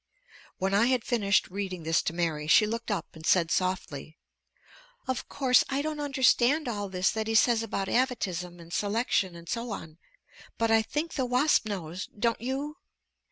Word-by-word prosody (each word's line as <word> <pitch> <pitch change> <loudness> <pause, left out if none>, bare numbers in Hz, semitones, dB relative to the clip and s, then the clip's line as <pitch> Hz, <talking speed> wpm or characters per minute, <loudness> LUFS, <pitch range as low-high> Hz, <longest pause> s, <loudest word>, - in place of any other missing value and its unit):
When 190 +1 -1
I 210 +4 +4
had 255 -3 +1
finished 205 -5 +2
reading 190 -3 -4
this 160 0 +2
to - - -2
Mary 165 -3 -2
she 215 +7 +6
looked 230 +2 -4
up 195 -7 -3
and 160 - -11
said 170 0 +3
softly: 165 -5 -2 0.9
"Of 260 -1 -3
course 260 -3 +4
I 280 +1 -1
don't 310 -1 -3
understand 275 0 +3
all 205 -4 -3
this 185 0 +1
that 220 0 -3
he 225 - -1
says 230 0 +4
about 200 -3 -3
'avatism 185 -9 -1
and 170 0 -11
selection' 205 -3 0
and 170 0 -12
so 235 +4 -3
on, 160 -6 -7 0.6
but 230 -1 +1
I 225 0 +5
think 300 +9 -3
the 260 - -1
wasp 250 -1 +3
knows. 185 -3 -5
Don't 230 +1 0
you?" 275 +5 -3
215 Hz, 175 wpm, -28 LUFS, 180-250 Hz, 0.9 s, she